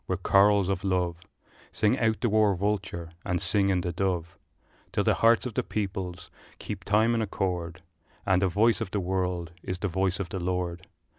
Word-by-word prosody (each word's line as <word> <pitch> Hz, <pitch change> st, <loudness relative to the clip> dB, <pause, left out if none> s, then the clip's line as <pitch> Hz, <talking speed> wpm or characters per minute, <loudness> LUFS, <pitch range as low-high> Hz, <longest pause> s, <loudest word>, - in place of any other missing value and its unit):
with 95 Hz, -1 st, -3 dB
chorals 100 Hz, -1 st, +5 dB
of 95 Hz, -2 st, -1 dB
love 90 Hz, -3 st, 0 dB, 0.6 s
Sing 110 Hz, +5 st, +1 dB
out 110 Hz, -2 st, +1 dB
the 120 Hz, -, +2 dB
war 105 Hz, -2 st, +3 dB
vulture 95 Hz, -4 st, -2 dB
and 90 Hz, 0 st, -1 dB
sing 100 Hz, +1 st, +2 dB
in 95 Hz, -2 st, +2 dB
the 90 Hz, -, -2 dB
dove, 90 Hz, -2 st, -2 dB, 0.6 s
Till -, -, 0 dB
the -, -, +3 dB
hearts 115 Hz, +1 st, +5 dB
of 125 Hz, -, -4 dB
the -, -, +1 dB
peoples 95 Hz, -4 st, -4 dB, 0.3 s
keep 100 Hz, -3 st, -6 dB
time 110 Hz, +4 st, +3 dB
in 115 Hz, -, +1 dB
accord, 90 Hz, -4 st, -3 dB, 0.4 s
And 95 Hz, -2 st, +3 dB
the 95 Hz, -, +3 dB
voice 110 Hz, +5 st, +2 dB
of -, -, -2 dB
the 100 Hz, -, -1 dB
world 90 Hz, -2 st, -2 dB
is 95 Hz, 0 st, -4 dB
the 105 Hz, -, -2 dB
voice 95 Hz, +1 st, 0 dB
of 95 Hz, -3 st, -3 dB
the 95 Hz, -, -4 dB
Lord! 90 Hz, -1 st, -3 dB
95 Hz, 195 wpm, -27 LUFS, 90-105 Hz, 0.6 s, chorals